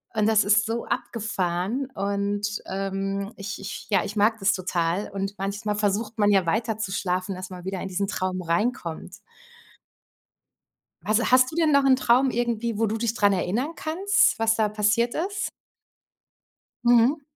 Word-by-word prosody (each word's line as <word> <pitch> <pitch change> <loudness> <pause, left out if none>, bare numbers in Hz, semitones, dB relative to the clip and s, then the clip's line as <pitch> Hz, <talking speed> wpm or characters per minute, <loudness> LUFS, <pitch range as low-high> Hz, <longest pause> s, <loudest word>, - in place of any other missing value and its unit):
und 215 -1 +2
das 220 -1 +4
ist 210 +1 +3
so 230 +1 -3
abgefahren 210 +2 -2
und, 200 +1 -1 0.2
ähm, 195 +1 -3
ich 200 0 -6
ich 195 +1 -7
ja, 195 -4 +3
ich 205 - -6
mag 220 +2 +3
das 195 +1 +3
total. 180 0 -1
Und 195 0 -4
manchmal 205 +2 -2
versucht 210 +2 -1
man 205 -1 +4
ja 195 -3 +3
weiter 220 +5 0
zu 210 -3 -4
schlafen, 185 0 -1
dass 185 0 -7
man 180 -1 -9
wieder 190 0 -4
in - - -4
diesen 195 +2 -2
Traum 185 -1 -2
reinkommt. 175 -1 -2 1.9
Was 215 +2 +1
hast 255 0 +5
du 315 - -8
denn 320 -2 +3
noch 280 -1 +4
'n 265 -1 +5
Traum 255 +1 +3
irgendwie, 235 -2 -1
wo 225 - +2
du 220 +1 -2
dich 225 0 -1
dran 205 -3 +3
erinnern 210 - -1
kannst, 360 - +2
was 225 0 +3
da 220 -1 +2
passiert 210 +3 +1
ist? 390 +4 -2 1.4
Mhm. 240 +5 +4
210 Hz, 165 wpm, -25 LUFS, 195-235 Hz, 1.9 s, hast